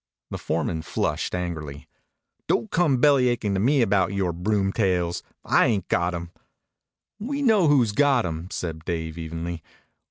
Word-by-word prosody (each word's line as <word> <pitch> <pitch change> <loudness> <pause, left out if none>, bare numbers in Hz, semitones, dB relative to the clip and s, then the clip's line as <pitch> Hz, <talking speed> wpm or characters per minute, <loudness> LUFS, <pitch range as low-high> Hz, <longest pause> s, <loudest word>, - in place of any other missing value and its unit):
The - - -4
foreman 80 -1 -2
flushed 85 +2 -2
angrily. 75 -6 -5 0.6
"Don't 115 - 0
come 160 -6 +2
bellyachin' 125 -6 +3
to 95 - 0
me 130 +5 +3
about 100 -3 +2
yore 95 -3 -1
broomtails. 95 -2 0 0.2
I - - +4
ain't 100 -6 -1
got 85 0 +1
'em." 85 0 -6 0.9
"We 280 +6 -3
know 215 - +4
who's 130 -7 +4
got 135 -1 +3
'em," 80 0 -4
said 80 -4 -5
Dave 80 -1 -4
evenly. 85 +1 -5
95 Hz, 140 wpm, -24 LUFS, 85-125 Hz, 0.9 s, I